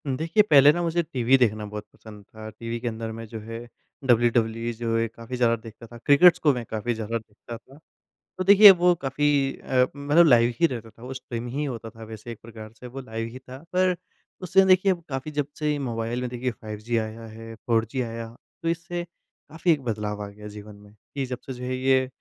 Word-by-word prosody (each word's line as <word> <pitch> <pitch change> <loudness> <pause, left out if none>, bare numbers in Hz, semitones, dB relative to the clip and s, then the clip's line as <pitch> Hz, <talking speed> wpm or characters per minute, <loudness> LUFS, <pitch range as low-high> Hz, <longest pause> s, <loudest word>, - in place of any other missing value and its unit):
देखिए 160 +9 +2
पहले 145 -1 +8
ना 175 - -2
मुझे 170 0 +1
टीवी 130 -3 +2
देखना 110 -4 +1
बहुत 105 0 -7
पसंद 105 -2 -13
था, 110 +1 -10
टीवी 115 +2 -6
के 120 - -4
अंदर 115 -1 -4
में 115 +1 -7
जो 110 +1 -7
है 115 +1 -7 0.5
डब्ल्यूडब्ल्यूई 115 -1 +2
जो 115 0 -1
है 115 0 +1
काफ़ी 115 +2 -8
ज़्यादा 120 -1 +3
देखता 115 +1 -12
था 120 - -12
क्रिकेटस 145 +8 +6
को 150 -3 +5
मैं 125 -2 -4
काफ़ी 110 +2 -2
ज़्यादा 110 +1 -3
देखता 110 +1 -10
था। 135 +4 -19 0.6
तो 185 - -1
देखिए 200 +2 +10
वो 180 -1 +4
काफ़ी 140 -1 +1
अ, 125 -1 +2
मतलब 145 +4 +4
लाइव 120 -4 +5
ही 170 - +5
रहता 115 -6 -6
था 115 +1 -18
वो 130 +1 -6
स्ट्रीम 120 -2 -6
ही 135 +5 -3
होता 115 -4 -5
था 115 0 -12
वैसे 110 +1 -9
एक 115 - -9
प्रकार 110 -1 -10
से 125 - -9
वो 135 +2 -8
लाइव 115 -2 -5
ही 130 - -9
था 130 0 -11 0.2
पर, 185 0 +3 0.5
उससे 190 +1 +4
देखिए 185 +1 +5 0.2
काफ़ी 135 +2 -4
जब 145 -2 -1
से 150 -1 +1
ये 145 - -1
मोबाइल 120 -2 -3
में 125 - -3
देखिए 125 +1 -3
5G 110 +2 -3
आया 110 +1 -6
है, 115 +1 -10
4G 115 +3 +1
आया 115 -1 -6 0.4
तो 165 - 0
इससे 170 +1 -3
काफ़ी 170 0 -4
एक 150 -3 +1
बदलाव 105 -3 -3
आ - - -6
गया 105 +1 -11
जीवन 105 0 -10
में 105 0 -17 0.2
कि 135 -1 -1
जब 125 -1 -5
से 135 - -5
जो 125 0 -9
है 130 0 -2
ये 130 0 +2
120 Hz, 220 wpm, -25 LUFS, 115-140 Hz, 0.6 s, देखिए